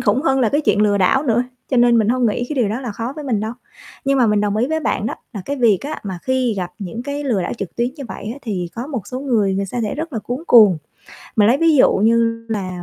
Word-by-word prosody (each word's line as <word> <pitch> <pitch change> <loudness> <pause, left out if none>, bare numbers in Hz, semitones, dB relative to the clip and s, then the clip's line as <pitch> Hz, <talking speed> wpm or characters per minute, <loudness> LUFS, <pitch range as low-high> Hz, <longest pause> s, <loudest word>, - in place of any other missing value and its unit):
khủng 220 +6 +1
hơn 270 -4 +2
là 235 - +3
cái 290 +7 +1
chuyện 210 -8 +2
lừa 205 -1 +2
đảo 195 +9 +3
nữa, 240 -4 +2 0.3
cho 260 - +1
nên 240 -1 +5
mình 215 -2 +2
hông 250 0 +2
nghĩ 230 +3 -1
cái - - -3
điều 240 -5 +2
đó 220 +5 -3
là 245 -5 -5
khó 230 +5 -4
với 300 - -6
mình 230 -7 0
đâu. 220 +1 -3 0.5
Nhưng 275 0 +2
mà 245 - +4
mình 210 -1 +2
đồng 205 0 0
ý 230 +3 +1
với 315 +2 -1
bạn 215 - -1
đó - - -3 0.2
là 205 - -5
cái 285 - -3
việc 230 -7 +3
á, 300 +2 -5
mà 190 -3 -5
khi 260 -3 0
gặp 180 -2 -3
những 205 +3 -6
cái 285 +2 -4
lừa 225 -9 0
đảo 175 - -3
trực 195 - -6
tuyến 240 +1 +1
như 280 - -7
vậy 210 - -6
á, 265 - -10
thì 190 -7 -3
có 235 +2 -5
một 260 - -5
số 255 0 -5
người, 220 -8 +1
người 195 +1 -1
sa 240 +5 -4
sẽ 210 - -2
rất 320 +1 -5
là 230 - -2
cuống 245 +7 -5
cuồng. 210 -8 +7 0.6
Mà 210 - +5
lấy 235 +5 +4
ví 325 -1 +4
dụ 255 - +5
như 230 +2 +2
là, 185 -5 -4
230 Hz, 295 wpm, -19 LUFS, 205-260 Hz, 0.6 s, cuồng